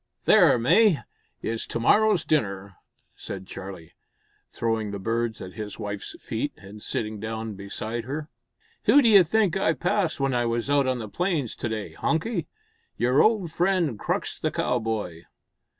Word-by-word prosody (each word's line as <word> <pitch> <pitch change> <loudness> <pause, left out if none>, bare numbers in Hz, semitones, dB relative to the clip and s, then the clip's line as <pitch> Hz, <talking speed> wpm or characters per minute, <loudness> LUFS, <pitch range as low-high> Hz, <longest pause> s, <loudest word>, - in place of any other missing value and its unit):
"There, 175 -11 +6
May, 170 - +5 0.5
is 115 0 -3
to - - -3
morrow's 210 - +4
dinner," 100 - -1 0.4
said 95 -1 -7
Charlie, 95 -4 -9 0.6
throwing 115 -2 -1
the 100 - -4
birds 115 +2 -2
at 90 0 -8
his 105 -2 -6
wife's 105 -2 -5
feet, - - -3
and 105 +2 -12
sitting 105 -1 -3
down 110 0 -4
beside 110 +4 -5
her. 145 +4 -4 0.6
"Who 290 - +7
d'you 210 -5 +7
think 195 +1 +2
I 180 -4 +2
passed 180 -1 0
when 135 -1 +1
I 120 -1 +1
was 115 +3 -1
out 140 -2 +3
on 130 -1 +1
the 110 -3 -5
plains 160 - -1
to 115 - -3
day, 110 -2 -4
Hunky? 170 +3 -1 0.5
Your 125 +3 +3
old 210 -7 +2
friend 170 - +1
Crux - - -2
the - - 0
Cowboy." 110 -8 -2
120 Hz, 155 wpm, -25 LUFS, 105-165 Hz, 0.6 s, Who